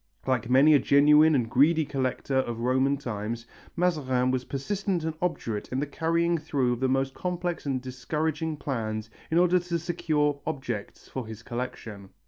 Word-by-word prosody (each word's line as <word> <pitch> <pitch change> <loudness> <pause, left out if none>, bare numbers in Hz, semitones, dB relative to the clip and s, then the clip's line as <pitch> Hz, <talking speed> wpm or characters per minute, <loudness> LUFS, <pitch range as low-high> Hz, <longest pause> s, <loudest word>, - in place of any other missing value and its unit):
Like 125 -3 0
many 135 +5 +6
a 145 - +6
genuine 150 +3 +5
and 120 -4 +1
greedy 150 +6 +3
collector 135 0 -2
of 120 -3 -1
Roman 130 +3 +2
times, 115 -3 -4 0.3
Mazarin 135 -8 +1
was 130 -1 -1
persistent 185 +5 -2
and 160 0 -2
obdurate 115 -12 -2
in 130 - -1
the 145 - 0
carrying 165 +3 0
through 140 -5 0
of 120 - -5
the 130 0 +1
most 135 0 0
complex 175 -2 -3
and 135 -2 0
discouraging 150 +5 -3
plans 110 -6 -3 0.2
in 160 - +1
order 180 +1 +4
to 175 -1 -2
secure 155 -4 0
objects 125 -9 -5
for 130 -4 -5
his 110 +1 -9
collection. 115 -5 -6
135 Hz, 165 wpm, -27 LUFS, 125-160 Hz, 0.3 s, many